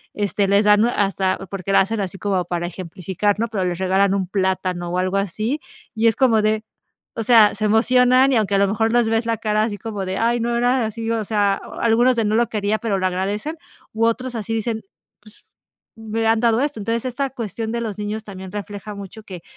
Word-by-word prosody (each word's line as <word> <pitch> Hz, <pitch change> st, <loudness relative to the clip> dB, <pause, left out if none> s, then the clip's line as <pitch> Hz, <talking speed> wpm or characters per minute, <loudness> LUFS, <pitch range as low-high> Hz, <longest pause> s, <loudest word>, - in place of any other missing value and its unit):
este, 205 Hz, -1 st, 0 dB
les 200 Hz, +2 st, +3 dB
dan 210 Hz, +1 st, +5 dB
hasta 195 Hz, -4 st, 0 dB
porque 195 Hz, -1 st, -4 dB
lo -, -, +6 dB
hacen 215 Hz, +3 st, 0 dB
así 195 Hz, 0 st, -4 dB
como 190 Hz, -3 st, 0 dB
para 175 Hz, 0 st, -2 dB
ejemplificar, 185 Hz, +3 st, -2 dB
¿no? 230 Hz, -, +1 dB
Pero, 200 Hz, -4 st, -1 dB
les 175 Hz, -1 st, -2 dB
regalan 190 Hz, +1 st, +2 dB
un 190 Hz, -2 st, -1 dB
plátano 185 Hz, -2 st, -1 dB
o 180 Hz, -, 0 dB
algo 185 Hz, +1 st, 0 dB
así, 215 Hz, -, -2 dB, 0.4 s
y 225 Hz, +1 st, 0 dB
es 225 Hz, -, +3 dB
como 235 Hz, -5 st, +3 dB
de 215 Hz, 0 st, +1 dB, 0.5 s
o 225 Hz, -, -1 dB
sea, 220 Hz, -3 st, +6 dB
se 215 Hz, +1 st, -2 dB
emocionan 250 Hz, +4 st, +4 dB
y -, -, +4 dB
aunque 205 Hz, -2 st, +1 dB
a -, -, +3 dB
lo 200 Hz, -, +4 dB
mejor 220 Hz, +3 st, 0 dB
les 240 Hz, -2 st, +3 dB
ves 225 Hz, +1 st, +1 dB
la 230 Hz, -1 st, 0 dB
cara, 215 Hz, -1 st, 0 dB
así 215 Hz, -2 st, -2 dB
como 205 Hz, -3 st, -5 dB
de: 185 Hz, +1 st, -3 dB
"Ay, 235 Hz, +1 st, +2 dB
no 235 Hz, +1 st, 0 dB
era 245 Hz, 0 st, +2 dB
así," 225 Hz, +1 st, -4 dB
o 225 Hz, -1 st, 0 dB
sea, 205 Hz, -2 st, +2 dB, 0.3 s
algunos 240 Hz, +3 st, +3 dB
de 225 Hz, -, +1 dB
no 210 Hz, +1 st, +1 dB
lo 235 Hz, 0 st, +2 dB
quería, 210 Hz, -1 st, 0 dB
pero, 215 Hz, -4 st, -1 dB
lo 185 Hz, -, -1 dB
agradecen 205 Hz, -, -3 dB, 0.4 s
u 220 Hz, +1 st, -1 dB
otros 250 Hz, +2 st, -2 dB
así 225 Hz, 0 st, -3 dB
dicen: 225 Hz, 0 st, -2 dB, 0.4 s
"Pues, 215 Hz, 0 st, -19 dB, 0.5 s
me 225 Hz, 0 st, -2 dB
han 225 Hz, 0 st, +3 dB
dado 230 Hz, -1 st, +3 dB
esto", 290 Hz, -2 st, -1 dB
entonces 230 Hz, +4 st, -2 dB
esta 270 Hz, +2 st, -2 dB
cuestión 225 Hz, -2 st, -5 dB
de 235 Hz, -, -2 dB
los 215 Hz, -4 st, -4 dB
niños 210 Hz, +1 st, -4 dB
también 190 Hz, -2 st, -9 dB
refleja 205 Hz, +1 st, -7 dB
mucho 200 Hz, +2 st, -9 dB
que 180 Hz, -4 st, -10 dB
215 Hz, 225 wpm, -21 LUFS, 195-230 Hz, 0.5 s, lo